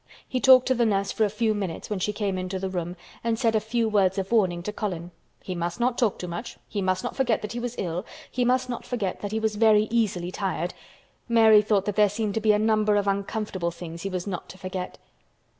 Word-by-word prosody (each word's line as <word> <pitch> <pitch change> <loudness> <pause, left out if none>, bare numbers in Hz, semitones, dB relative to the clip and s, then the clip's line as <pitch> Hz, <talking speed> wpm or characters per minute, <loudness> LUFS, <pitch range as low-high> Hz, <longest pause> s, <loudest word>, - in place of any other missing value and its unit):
He 255 - -1
talked 255 -1 +7
to 260 - +3
the 240 -1 +2
nurse 200 -3 +1
for 220 - +2
a - - 0
few 220 +1 +1
minutes 195 -6 -4
when 210 -3 -3
she 210 - 0
came 205 -2 -2
into 185 +1 -3
the 190 0 -3
room 175 -1 -3 0.3
and 230 -1 0
said 230 -2 +2
a 220 - +3
few 225 +2 0
words 200 -3 +2
of 195 +1 -3
warning 185 -7 +2
to 210 - -4
Colin. 180 -5 -4 0.3
He 185 - -4
must 175 +3 -3
not 240 0 +2
talk 230 -5 +1
too 180 - -6
much; 175 +7 -6
he 205 - -3
must 185 +1 0
not 245 - -4
forget 245 -6 +1
that 210 - -4
he 240 - -4
was 245 0 -4
ill; 175 0 -2 0.3
he 250 - 0
must 255 +1 +2
not 245 -2 -4
forget 215 -7 -3
that 205 - -4
he 220 - 0
was 220 -1 -1
very 215 -1 +5
easily 190 -7 0
tired. 185 -3 -2 0.6
Mary 220 -2 +7
thought 205 -2 +1
that 205 0 -2
there 210 -1 +5
seemed 210 0 -2
to 220 - -1
be 215 0 +4
a 210 - +4
number 215 -1 +2
of 205 -1 +1
uncomfortable 200 -2 -1
things 170 -1 -8
he 195 - -3
was 185 -2 -3
not 185 -4 -5
to 185 - -10
forget. 185 -1 -5
210 Hz, 250 wpm, -26 LUFS, 185-225 Hz, 0.6 s, talked